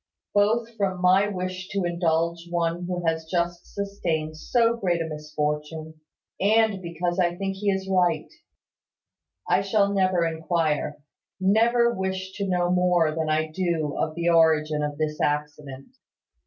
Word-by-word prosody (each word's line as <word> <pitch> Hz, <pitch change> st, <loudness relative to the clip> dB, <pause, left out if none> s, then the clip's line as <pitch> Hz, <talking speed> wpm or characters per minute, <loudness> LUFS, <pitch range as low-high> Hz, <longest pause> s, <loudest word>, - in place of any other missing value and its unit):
Both 225 Hz, +3 st, +2 dB
from 190 Hz, -3 st, -1 dB
my 185 Hz, +3 st, +4 dB
wish 185 Hz, -1 st, -4 dB
to 200 Hz, -2 st, -1 dB
indulge 170 Hz, -1 st, 0 dB
one 170 Hz, 0 st, -1 dB
who 180 Hz, -1 st, -3 dB
has 160 Hz, 0 st, -1 dB
just 175 Hz, 0 st, -2 dB
sustained 170 Hz, -6 st, -3 dB
so 230 Hz, +7 st, +2 dB
great 180 Hz, -6 st, 0 dB
a 165 Hz, -, -1 dB
misfortune, 150 Hz, +1 st, -4 dB, 0.4 s
and 215 Hz, -1 st, +3 dB
because 175 Hz, +1 st, -3 dB
I 175 Hz, -1 st, +2 dB
think 195 Hz, +1 st, -3 dB
he 205 Hz, +1 st, 0 dB
is 190 Hz, -1 st, -1 dB
right, 180 Hz, -5 st, +1 dB, 1.2 s
I -, -, +3 dB
shall 200 Hz, 0 st, +2 dB
never 185 Hz, -3 st, +2 dB
inquire, 160 Hz, -2 st, -1 dB, 0.4 s
never 235 Hz, +5 st, +3 dB
wish 190 Hz, -1 st, -3 dB
to 200 Hz, -1 st, -2 dB
know 180 Hz, -1 st, +1 dB
more 180 Hz, -3 st, +3 dB
than 160 Hz, -1 st, -2 dB
I 155 Hz, 0 st, 0 dB
do 165 Hz, -4 st, -1 dB
of 155 Hz, -, -2 dB
the 170 Hz, 0 st, 0 dB
origin 155 Hz, -2 st, +3 dB
of 150 Hz, -1 st, -3 dB
this 155 Hz, 0 st, -2 dB
accident. 145 Hz, -, -3 dB
175 Hz, 145 wpm, -25 LUFS, 160-190 Hz, 1.2 s, my